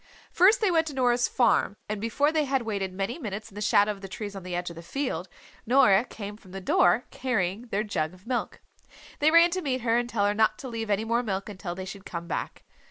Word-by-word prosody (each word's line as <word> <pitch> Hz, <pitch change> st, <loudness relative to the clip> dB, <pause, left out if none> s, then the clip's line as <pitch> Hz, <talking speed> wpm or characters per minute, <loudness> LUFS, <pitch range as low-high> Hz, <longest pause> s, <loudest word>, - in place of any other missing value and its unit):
First 420 Hz, +7 st, +5 dB
they 415 Hz, -4 st, +3 dB
went 325 Hz, -1 st, +2 dB
to 290 Hz, -, -5 dB
Nora's 245 Hz, -1 st, +2 dB
farm 235 Hz, -5 st, +2 dB
and 210 Hz, -1 st, -4 dB
before 280 Hz, +7 st, +1 dB
they 310 Hz, -2 st, +1 dB
had 270 Hz, -2 st, 0 dB
waited 200 Hz, -4 st, -2 dB
many 195 Hz, -, -3 dB
minutes 215 Hz, -3 st, -6 dB
in -, -, -18 dB
the 205 Hz, -, -7 dB
shadow 205 Hz, 0 st, +4 dB
of 200 Hz, -2 st, -8 dB
the 195 Hz, -, -7 dB
trees 205 Hz, +1 st, -6 dB
on 195 Hz, -, -6 dB
the 180 Hz, -1 st, -5 dB
edge 175 Hz, 0 st, -3 dB
of -, -, -11 dB
the 165 Hz, -, -8 dB
field 185 Hz, -, -3 dB, 0.4 s
Nora 240 Hz, -4 st, +5 dB
came 205 Hz, -3 st, -8 dB
from 190 Hz, -4 st, -17 dB
the 195 Hz, -, -5 dB
door 185 Hz, +4 st, +3 dB
carrying 225 Hz, -3 st, -2 dB
their 210 Hz, -1 st, -1 dB
jug 160 Hz, -7 st, -2 dB
of 185 Hz, -, -21 dB
milk. 245 Hz, 0 st, -3 dB, 0.6 s
They 295 Hz, -, +5 dB
ran 335 Hz, +2 st, +6 dB
to 370 Hz, +1 st, -1 dB
meet 260 Hz, -5 st, -1 dB
her 230 Hz, 0 st, +2 dB
and 240 Hz, 0 st, -3 dB
tell 205 Hz, -4 st, +1 dB
her 205 Hz, -, +2 dB
not 215 Hz, 0 st, +2 dB
to 265 Hz, -, -7 dB
leave 225 Hz, -3 st, -4 dB
any 210 Hz, +2 st, +1 dB
more 230 Hz, +2 st, +1 dB
milk 195 Hz, -3 st, -3 dB
until 185 Hz, -3 st, -6 dB
they 190 Hz, 0 st, -6 dB
should 195 Hz, +1 st, -8 dB
come 170 Hz, -3 st, -6 dB
back. -, -, -4 dB
215 Hz, 250 wpm, -27 LUFS, 195-255 Hz, 0.6 s, ran